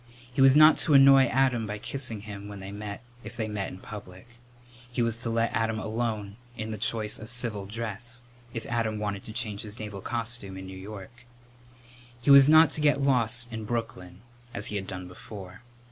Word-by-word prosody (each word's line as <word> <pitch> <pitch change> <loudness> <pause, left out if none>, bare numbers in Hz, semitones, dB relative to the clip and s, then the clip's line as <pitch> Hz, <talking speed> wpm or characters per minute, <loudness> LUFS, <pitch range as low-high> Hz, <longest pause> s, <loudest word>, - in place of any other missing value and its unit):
He 135 - 0
was 135 0 +7
not 155 +1 +8
to 150 - +4
annoy 135 -1 +8
Adam 125 -3 +1
by 105 0 -4
kissing 115 -1 -3
him 100 -1 -8
when 100 -1 -8
they 95 +1 -8
met, 105 +1 -7 0.2
if 120 +3 -10
they 110 -2 -2
met 105 -2 -3
in - - -9
public. 95 -1 -11 0.6
He 120 0 0
was 115 0 -1
to 120 - -2
let 115 0 0
Adam 110 0 0
alone 110 -2 -3 0.2
in 110 0 -4
the 110 - -5
choice 110 -1 0
of 110 - -9
civil 115 -6 -1
dress, 115 +2 -5 0.3
if 115 -1 -6
Adam 115 -2 -1
wanted 105 -1 -3
to - - -7
change 110 -2 -4
his 105 -1 -8
naval 105 -3 -7
costume 115 -4 -3
in 95 - -8
New 95 0 -9
York. 105 +5 -10 0.9
He 125 +4 +2
was 140 0 +9
not 155 -1 +7
to 150 - -1
get 145 -1 +3
lost 120 -3 +3
in 110 -1 -5
Brooklyn, 105 -5 -5 0.3
as 105 - -1
he - - -2
had 95 -1 -3
done 90 -1 -6
before. 95 +1 -11
110 Hz, 200 wpm, -27 LUFS, 100-120 Hz, 0.9 s, was